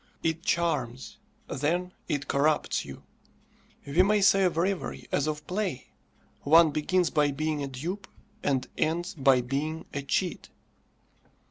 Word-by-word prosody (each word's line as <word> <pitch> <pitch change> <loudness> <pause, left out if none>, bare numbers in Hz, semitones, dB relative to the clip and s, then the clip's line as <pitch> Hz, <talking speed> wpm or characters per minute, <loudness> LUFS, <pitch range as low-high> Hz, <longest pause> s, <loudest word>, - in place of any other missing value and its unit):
It 165 0 0
charms; 135 -9 -1 0.3
then 175 +6 -1 0.2
it 145 -1 -2
corrupts 150 - +1
you. 70 -1 -10 0.8
We 140 +6 +3
may 205 +2 +3
say 195 0 +5
of 175 -3 0
reverie 185 +2 -2
as 145 +1 +1
of 150 -1 -3
play, 185 -9 -3 0.5
one 160 +2 +6
begins 175 +4 +1
by 150 -2 +3
being 150 +1 -2
a 140 - -2
dupe, 170 +10 -5 0.3
and 130 -2 0
ends 175 +5 0
by 135 -5 +4
being 150 +6 -3
a 145 - -2
cheat. 175 +6 -2
155 Hz, 135 wpm, -28 LUFS, 140-180 Hz, 0.8 s, one